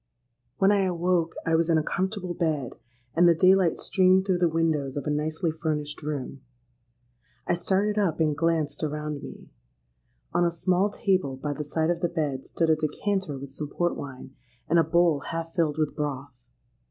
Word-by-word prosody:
"When 195 +1 +4
I 205 - +3
awoke, 175 -2 0
I 165 - +1
was 165 +1 +2
in 165 - +4
a 155 - +1
comfortable 190 +1 -2
bed; 155 -7 -1 0.4
and 175 +1 +6
the 170 - +5
day 185 +3 +6
light 185 -4 +2
streamed 185 0 +3
through 185 -3 +1
the 175 -1 +3
windows 155 -4 0
of 140 - -4
a 150 - 0
nicely 155 +3 -1
furnished 150 -2 -3
room. 140 -3 -5 1.0
I - - +1
started 195 +4 +1
up, 185 -7 0
and 155 -2 +2
glanced 155 -2 0
around 150 -1 -3
me. - - -11 0.8
On 175 - +3
a 170 - +3
small 180 +3 +1
table 185 -9 0
by 145 +2 -3
the 150 - -4
side 160 +3 0
of 170 - -2
the 175 - +1
bed 150 -6 -3
stood 165 -1 +1
a - - +5
decanter 155 +1 -2
with 135 0 -9
some 150 +2 -5
port 175 +4 -1
wine, 130 -1 -8 0.3
and 170 +2 +4
a - - +5
bowl 170 -4 +3
half 165 0 -4
filled 160 -4 0
with 155 -2 -1
broth. 140 -2 -4
165 Hz, 190 wpm, -26 LUFS, 150-175 Hz, 1.0 s, and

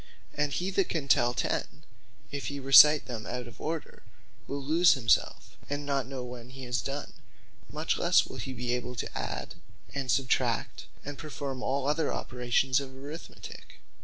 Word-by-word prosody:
And 150 0 0
he 180 +6 -1
that 195 0 +1
can 155 -5 -2
tell 120 -2 +4
ten, 150 - -2 0.5
if 140 -1 -4
he 140 0 -4
recite 145 +2 +8
them 115 -4 -6
out 125 0 -4
of 115 - -13
order, 160 0 -4 0.5
will 140 - -3
lose 165 +5 +5
himselfe, 120 -4 +1
and 145 0 -3
not 140 -3 0
know 130 -2 -5
when 125 -1 -9
he 130 0 -10
has 125 0 -1
done: 140 +1 -5 0.6
Much 155 +2 -1
lesse 175 +1 +4
will - - -9
he 135 - -5
be 125 -1 -2
able 125 0 -3
to - - -5
add, - - -4 0.4
and 135 -2 -3
substract, 125 +1 0 0.2
and 145 0 -6
performe 140 -4 -5
all 135 +1 -1
other 150 +1 +1
operations 125 +1 +1
of 140 -1 -6
Arithmetique. 140 +5 -10
135 Hz, 170 wpm, -29 LUFS, 125-145 Hz, 0.6 s, recite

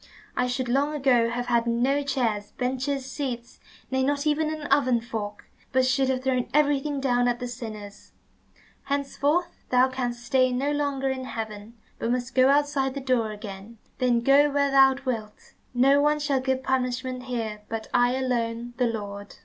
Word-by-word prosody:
I 250 - +1
should 250 0 -2
long 280 +5 +1
ago 250 -5 +3
have 245 +1 -3
had 235 -1 +1
no 250 +5 +2
chairs, 230 -7 -1
benches, 260 +2 -2
seats, 260 -3 -5 0.3
nay, 265 0 +1
not 285 +2 0
even 305 +1 +1
an 310 -1 -5
oven 265 -3 +3
fork, 220 -3 -6 0.3
but 260 0 +3
should 265 0 +2
have 260 -1 -1
thrown 255 -2 0
everything 290 -1 +2
down 245 -2 +2
at 240 0 +1
the 250 - -4
sinners. 215 -4 -8 0.7
Henceforth 285 +5 -1
thou 255 +1 +4
canst 245 -2 -4
stay 255 +1 +3
no 270 +4 0
longer 285 -2 0
in 260 -1 -4
heaven, 220 -1 -6 0.2
but 230 - -2
must 250 +1 -2
go 260 0 +5
outside 280 -2 +2
the - - -2
door 255 -4 +1
again. 210 +1 -9 0.2
Then 245 -2 +2
go 280 +4 +5
where 280 -1 +1
thou 270 -1 +6
wilt. 220 -4 -5 0.2
No 275 +3 +5
one 300 +1 +3
shall 290 -2 0
give 260 0 -1
punishment 255 -1 -1
here, 225 -4 -4
but 225 -1 -4
I 245 +1 +3
alone, 240 -2 -2
the 250 -2 +2
Lord." 205 -3 -6
255 Hz, 175 wpm, -26 LUFS, 235-275 Hz, 0.7 s, thou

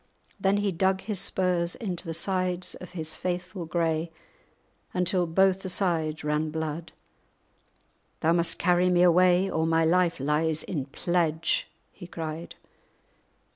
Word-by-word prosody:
Then 195 +1 +2
he 205 -1 0
dug 190 +2 +1
his 210 -4 -2
spurs 180 -3 +1
into 185 -5 -5
the 165 - -3
sides 185 0 -1
of 180 - -10
his 160 -3 0
faithful 180 0 -4
grey, 165 0 -1 0.8
until 180 0 +1
both 190 +3 +3
the 190 - -5
sides 165 -5 0
ran 150 +1 0
blood. 160 +1 -4 1.3
"Thou 165 +1 +3
must 170 -1 +1
carry 180 0 +3
me 175 0 +4
away, 180 +1 +5
or 160 -4 0
my 165 0 +3
life 175 0 +2
lies 150 +3 0
in 145 -7 -3
pledge," 165 +2 0 0.2
he 175 - -11
cried. 160 -1 -6
175 Hz, 135 wpm, -27 LUFS, 160-185 Hz, 1.3 s, away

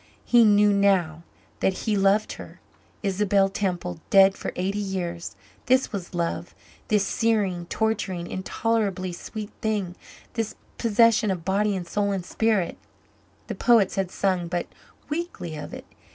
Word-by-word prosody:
He 240 -1 +6
knew 205 -1 +5
now 190 -6 +2 0.4
that 190 - +2
he 215 - +1
loved 200 +2 +2
her - - -11 0.4
Isabel 195 0 +2
Temple, 180 -3 -3
dead 195 0 +6
for - - -5
eighty 195 +3 -1
years. 180 -4 -4 0.3
This 255 +1 +3
was 185 -3 -5
love 170 0 -2 0.3
this 210 -2 +2
searing, 200 -7 0
torturing, 195 -6 -1
intolerably 190 -1 -1
sweet 210 +4 -7
thing 205 -5 -1 0.4
this 225 -2 -3 0.2
possession 230 -1 +4
of 180 -4 -3
body 200 +1 +1
and 180 -2 -5
soul 200 +3 0
and 185 -3 -3
spirit. 215 -5 0 0.7
The - - -4
poets 230 -6 +4
had 195 -2 -1
sung 185 -3 0
but 175 0 -2 0.4
weakly 295 - -4
of 150 - -7
it. - - -8
195 Hz, 140 wpm, -25 LUFS, 180-215 Hz, 0.7 s, He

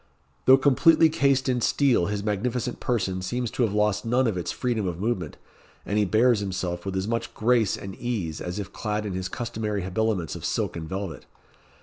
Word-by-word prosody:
Though 130 +1 +8
completely 160 +4 +5
cased 140 -3 +2
in 125 -2 +1
steel, 130 -8 +3
his 100 0 -2
magnificent 120 +4 -2
person 95 -6 -1
seems 120 +5 -2
to - - -3
have 115 -4 +2
lost 105 0 +1
none 125 +3 +2
of 110 -5 0
its 90 - -3
freedom 115 -6 -1
of 85 -1 -4
movement, 95 -7 -2 0.5
and 105 +1 0
he 105 - +3
bears 110 +4 +3
himself 95 -2 -3
with 95 - -3
as 95 +1 -1
much 115 +1 -3
grace 115 -2 +2
and 95 -1 -7
ease 100 -11 -3
as 90 +2 -4
if 100 -2 -6
clad 105 -1 -2
in 100 - -3
his 95 0 -3
customary 110 -3 -3
habiliments 95 -3 -1
of - - -8
silk - - -1
and 80 -1 -6
velvet. 95 -1 -5
105 Hz, 200 wpm, -25 LUFS, 95-120 Hz, 0.5 s, Though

